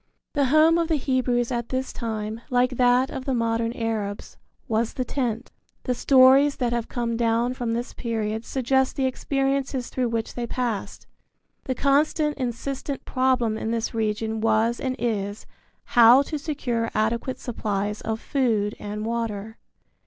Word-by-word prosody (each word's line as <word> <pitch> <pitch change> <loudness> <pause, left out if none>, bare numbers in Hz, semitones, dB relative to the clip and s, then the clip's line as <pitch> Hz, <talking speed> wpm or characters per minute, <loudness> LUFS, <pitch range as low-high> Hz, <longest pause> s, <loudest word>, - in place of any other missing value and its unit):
The 285 -2 +2
home 310 +5 +5
of 335 - +1
the 320 - +2
Hebrews 255 -3 0
at 235 -1 -2
this 260 0 -2
time, 220 -1 -4
like 250 0 +2
that 250 +1 +3
of 265 -1 -5
the 265 - 0
modern 230 0 0
Arabs, 220 -4 -3 0.3
was 225 -1 0
the 255 - -2
tent. 245 -4 -2 0.3
The 250 - 0
stories 270 +3 +5
that 240 -2 -1
have 235 -1 -2
come 235 -2 -2
down 235 +1 +1
from 240 -3 -2
this 240 +2 -3
period 220 -2 -3
suggest 265 +1 0
the 270 - 0
experiences 270 0 -1
through 250 -2 -1
which 230 -1 -2
they 240 -1 -4
passed. 235 -4 -3 0.6
The 260 - -1
constant 295 +2 +2
insistent 265 +2 -4
problem 255 -4 +1
in 220 - -3
this 230 +1 -2
region 220 0 -1
was 225 +1 +2
and 260 -1 -2
is 210 -3 -2 0.4
how 240 +3 +6
to 305 +1 -4
secure 245 -7 -2
adequate 230 +4 0
supplies 210 -3 -3
of 220 0 -3
food 225 -8 0
and 210 +1 -5
water. 225 -2 -3
240 Hz, 155 wpm, -24 LUFS, 225-260 Hz, 0.6 s, how